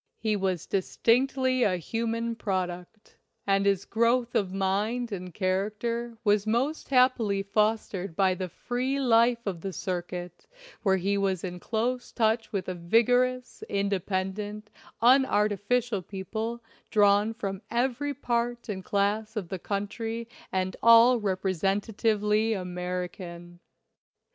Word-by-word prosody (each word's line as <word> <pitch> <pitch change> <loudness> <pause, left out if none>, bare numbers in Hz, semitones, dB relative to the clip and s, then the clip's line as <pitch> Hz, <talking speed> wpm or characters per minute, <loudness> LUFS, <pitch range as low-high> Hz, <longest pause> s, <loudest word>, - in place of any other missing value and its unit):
He 215 -1 0
was 190 -4 -1
distinctly 255 +6 +1
a 190 -6 +3
human 230 +5 -2
product, 185 -1 -4 0.3
and 195 0 +2
his 195 -1 +1
growth 235 +1 +1
of 195 -3 +1
mind 205 +5 -1
and 185 -2 -5
character 215 +6 -2
was 205 -1 +2
most 260 +8 0
happily 250 -7 +3
fostered 200 -3 0
by 190 0 +3
the 185 0 -4
free 255 +8 -2
life 235 -2 +3
of 185 -5 -3
the 195 - -4
circuit, 175 -1 -5 0.3
where 190 -3 +3
he 200 +2 0
was 190 -3 0
in 180 -1 -5
close 240 +5 -2
touch 225 0 +1
with 195 -3 -3
a 185 - -2
vigorous, 245 +8 +1
independent, 200 +1 -2 0.3
unarti 235 -5 +4
ficial 240 -6 0
people 220 +4 -4 0.3
drawn 205 +1 +4
from 195 -4 -4
every 260 +4 -1
part 240 -2 -2
and 190 -2 -4
class 210 +3 0
of 195 -6 -4
the 190 - -4
country 225 +4 -3 0.2
and 185 -1 -1
all 230 +2 +7
representatively 205 +3 0
American. 180 -2 -5
210 Hz, 125 wpm, -27 LUFS, 190-235 Hz, 0.3 s, all